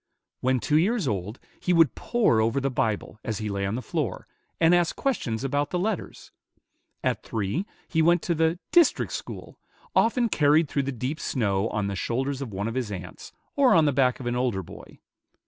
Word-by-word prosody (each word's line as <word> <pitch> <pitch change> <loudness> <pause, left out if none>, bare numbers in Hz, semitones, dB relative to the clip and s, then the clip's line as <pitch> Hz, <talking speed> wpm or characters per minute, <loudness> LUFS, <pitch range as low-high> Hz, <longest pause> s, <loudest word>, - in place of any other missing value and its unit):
When 130 0 +1
two 150 +5 +2
years 200 - +1
old, 105 +1 -3 0.2
he 180 - +1
would 165 -5 +5
pore 220 - +2
over 115 +5 +1
the 135 0 -1
Bible, 110 -2 -2
as 110 -3 -3
he 110 0 -3
lay 100 -1 -2
on 100 - -2
the 125 - -4
floor, - - -3 0.3
and 165 +1 +5
ask 175 -2 +2
questions 125 - -2
about 145 +2 0
the 180 - -1
letters; 195 +1 -3 0.7
at - - 0
three, 110 - -2 0.2
he 160 - +1
went 170 +1 +3
to 170 - 0
the 160 +1 +1
"district 345 -4 +4
school," - - -7 0.4
often 235 +1 +3
carried 150 -4 +3
through 140 - 0
the - - -1
deep 130 +5 -4
snow 100 -5 0
on 105 -1 -2
the 100 0 -2
shoulders 130 +7 -2
of 130 -5 -5
one 100 +2 -3
of 115 - -3
his 125 -4 -2
aunts, 95 -3 -8 0.2
or 270 -6 +5
on 160 -2 +5
the 145 - +2
back 125 -2 +2
of 130 - -7
an 120 0 -1
older 120 -6 0
boy. - - -13
135 Hz, 200 wpm, -26 LUFS, 110-165 Hz, 0.7 s, would